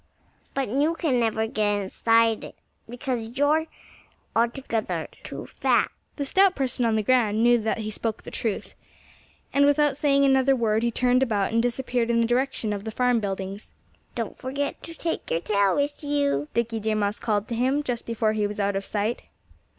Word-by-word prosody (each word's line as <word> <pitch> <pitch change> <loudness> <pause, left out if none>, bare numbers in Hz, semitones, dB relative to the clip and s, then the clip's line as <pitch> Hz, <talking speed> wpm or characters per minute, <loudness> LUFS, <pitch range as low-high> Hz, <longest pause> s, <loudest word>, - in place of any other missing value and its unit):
But 275 -1 0
you 285 +9 +1
can 280 -7 +1
never 220 -1 +1
get 210 -2 0
inside 225 +3 +2
it, - - -9 0.3
because 245 -1 -4
you're 305 +3 +2 0.7
altogether 230 -1 -1
too - - -7
fat." - - +1 0.2
The 285 - -3
stout 380 +6 +4
person 260 -2 -1
on 225 -1 +2
the 215 - +1
ground 225 -2 +2
knew 240 0 +5
that 220 +1 -1
he 215 -1 -4
spoke 220 +1 -2
the - - -9
truth. 220 -4 -3 0.8
And 280 - +4
without 290 0 +3
saying 280 -1 +3
another 265 0 +4
word 220 -3 +1
he 235 - +1
turned 250 +2 +2
about 215 -5 0
and 230 - +3
disappeared 245 0 -1
in 235 0 +3
the 230 - +3
direction 240 -2 0
of 200 -1 -5
the 220 - -4
farm 250 +1 +2
buildings. 195 0 -5 0.4
"Don't 230 -3 -3
forget 280 +2 -4
to 330 - -9
take 330 0 -3
your 165 - 0
tail 200 0 +2
with 290 +1 -1
you!" 285 - 0
Dickie 230 -1 0
Deer 215 0 0
Mouse 205 0 0
called 210 -2 -1
to 235 - -2
him, 260 +5 +1
just 245 -4 -3
before 225 -2 0
he 210 -1 0
was 210 0 -7
out 200 0 0
of 195 - -1
sight. 210 +3 -2
235 Hz, 190 wpm, -25 LUFS, 215-270 Hz, 0.8 s, knew